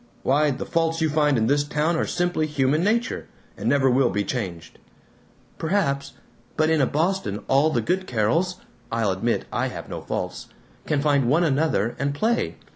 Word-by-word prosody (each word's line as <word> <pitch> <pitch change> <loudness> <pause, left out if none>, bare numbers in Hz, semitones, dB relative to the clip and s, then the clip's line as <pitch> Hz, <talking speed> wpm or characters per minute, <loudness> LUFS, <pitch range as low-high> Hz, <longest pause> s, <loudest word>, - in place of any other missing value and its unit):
Why, 150 +3 +3
the 130 - -3
faults 165 0 0
you 160 -2 +1
find 150 -3 +2
in 110 - +2
this 145 +4 +2
town 150 +3 0
are 160 - 0
simply 175 -3 0
human 145 +2 +1
nature, 230 +4 0 0.3
and - - -2
never 140 -2 +3
will 130 -1 +3
be 105 - -1
changed." 90 -8 -5 0.8
"Perhaps. 140 -6 0 0.4
But 155 0 +3
in 160 -2 +3
a 130 - +3
Boston 150 - -1
all 140 +4 +4
the 125 -6 0
good 185 - -1
Carols 125 - +1 0.4
(I'll 115 -3 +1
admit 105 +6 -1
I - - 0
have - - -8
no - - -5
faults) - - -4 0.4
can 145 -2 +1
find 140 -5 +2
one 160 +6 +3
another 140 - +1
and 140 +1 -1
play. 230 +8 0
145 Hz, 180 wpm, -24 LUFS, 125-160 Hz, 0.8 s, all